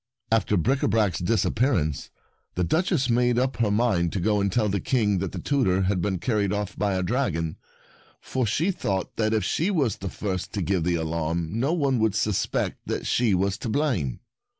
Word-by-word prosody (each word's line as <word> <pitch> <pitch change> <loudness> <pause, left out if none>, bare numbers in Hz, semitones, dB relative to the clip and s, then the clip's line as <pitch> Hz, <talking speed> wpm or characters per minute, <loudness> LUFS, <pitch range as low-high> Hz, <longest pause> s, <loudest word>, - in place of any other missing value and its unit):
After 110 -2 +2
Bricabrac's 110 - +1
disappear 115 +7 +1
ance, 75 -5 -2 0.5
the 90 - 0
Duchess 160 - +1
made 120 0 +2
up 130 +1 0
her 115 -3 +2
mind 100 -6 +1
to 100 - -1
go 105 +2 +1
and 100 -1 0
tell 110 +1 +1
the 100 0 0
King 105 -2 +1
that 95 -1 -3
the - - -6
tutor 95 -10 +1
had 95 -1 0
been 95 +1 0
carried 105 0 0
off 105 0 -3
by 100 -2 0
a 95 - 0
dragon, 90 - -1 0.6
for 130 -3 -2
she 160 - +1
thought 100 - -3
that 110 -1 +1
if 110 -2 +1
she 165 - 0
was 140 - +1
the 95 - -5
first 95 -2 -4
to 100 - -1
give 90 -2 0
the 90 -1 +1
alarm 80 0 -2
no 120 +8 0
one 140 -7 +1
would 110 -2 +1
suspect 105 -1 -1
that - - -3
she 115 -5 +2
was 95 +2 0
to 115 - -4
blame. 110 - -1
105 Hz, 195 wpm, -25 LUFS, 90-120 Hz, 0.6 s, After